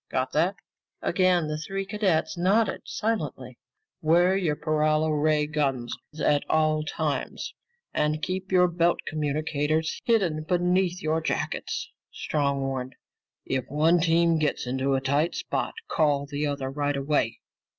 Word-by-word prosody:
Got 130 0 -1
that?" 170 +6 +2 0.5
Again 180 -2 +2
the 155 0 -3
three 195 +5 -4
cadets 195 -5 0
nodded 195 +5 +2
silently. 150 - -3 0.4
"Wear 175 +4 +4
your 175 -6 +1
paralo 155 +1 +1
ray 150 0 +2
guns 135 -6 -1 0.2
at 145 -1 +2
all 155 -1 +2
times 155 -2 -3 0.4
and 150 +1 +1
keep 190 +1 -3
your 180 -1 +5
belt 170 0 +1
communicators 155 +1 -1
hidden 190 -10 +2
beneath 180 +2 +1
your 155 +1 +1
jackets," - - -3 0.2
Strong 140 -2 -1
warned. 130 -1 -3 0.5
"If 130 -2 -1
one 160 +5 +3
team 165 0 +3
gets 150 -4 0
into 130 +2 0
a 135 - 0
tight 145 +5 +1
spot, - - -2
call 145 -3 +1
the 145 +1 -2
other 140 -2 -3
right 145 0 -1
away. 140 -5 0
155 Hz, 135 wpm, -26 LUFS, 145-175 Hz, 0.5 s, your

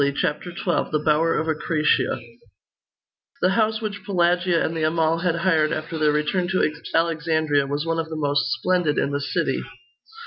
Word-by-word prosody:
CHAPTER 150 +5 -2
XII: 175 0 -1
THE 155 -1 0
BOWER 160 +2 +3
OF 160 - -1
ACRASIA 155 -4 +1 1.2
The 180 - +5
house 220 +2 +1
which 205 -2 -4
Pelagia 175 -2 +2
and 165 - -3
the 160 - -2
Amal 160 +1 +1
had 175 -1 0
hired 165 -3 +2
after 160 0 -4
their 155 -1 +3
return 150 +5 0
to 185 -4 +1 0.2
Alexandria, 155 -3 +1
was 145 +2 -2
one 165 0 -1
of 160 0 -3
the 160 - -5
most 145 -5 0
splendid 170 +2 +1
in 140 - 0
the 145 0 -2
city. 65 - -1
160 Hz, 170 wpm, -23 LUFS, 150-175 Hz, 1.2 s, The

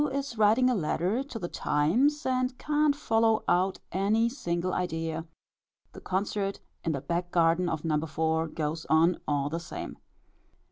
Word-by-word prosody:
is 275 -2 -3
writing 220 +4 +4
a 255 - +3
letter 190 - 0
to 275 -4 -8
the 175 - -4
Times, 250 - +1
and 255 0 0
can't 300 -1 +2
follow 225 -5 +2
out 185 +2 +2
any 210 +5 +2
single 180 -8 -2
idea; 165 -2 -2 0.7
the - - -10
concert 195 +1 -2 0.2
in 165 - 0
the 140 - -3
back 175 +3 -2
garden 170 +1 +2
of 160 0 -3
No. 155 -1 +1
4. 160 0 0
goes 155 0 -3
on 165 +2 +4
all 145 -2 +1
the 165 +3 -3
same. 175 +2 -7
180 Hz, 155 wpm, -28 LUFS, 160-230 Hz, 0.7 s, writing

